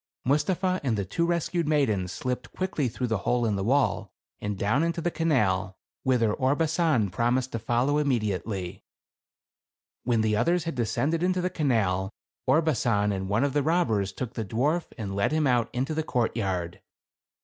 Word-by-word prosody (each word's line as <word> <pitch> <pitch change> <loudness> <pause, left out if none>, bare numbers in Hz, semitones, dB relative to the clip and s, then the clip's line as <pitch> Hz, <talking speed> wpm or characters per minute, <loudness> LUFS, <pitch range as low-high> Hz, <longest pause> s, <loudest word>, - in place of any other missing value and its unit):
Mustapha 180 +7 +1
and 120 -5 0
the 100 - -1
two 170 - -1
rescued 170 -1 0
maidens 110 -12 +1
slipped 125 +3 -4
quickly 185 -7 -1
through 125 +2 -3
the 115 -4 0
hole 120 +5 +1
in 105 -2 +1
the 95 - -2
wall, 110 -5 +1 0.3
and 105 -1 -3
down 105 +9 +1
into 170 +1 0
the 170 +1 -1
canal, 100 - +1 0.2
whither 120 -5 +2
Orbasan 145 - +1
promised 120 +6 0
to 115 - -3
fol 120 +3 +1
low 145 +1 +2
immediately. 105 -8 -2 1.2
When 115 -2 +2
the 110 -1 +1
others 170 +10 +2
had 165 - -3
descended 135 +7 0
into 185 +1 +1
the 180 0 -1
canal, 100 - +1 0.4
Orbasan 120 -10 +2
and 95 -1 -3
one 110 +6 +2
of 140 -2 0
the 145 - +2
robbers 125 - +1
took 125 +3 -5
the 115 - -3
dwarf 140 - 0
and 100 -4 -4
led 100 +6 +1
him 155 -1 +1
out 120 -3 +2
into 135 +5 -2
the 160 - 0
courtyard. 100 - -2
125 Hz, 170 wpm, -27 LUFS, 105-155 Hz, 1.2 s, whither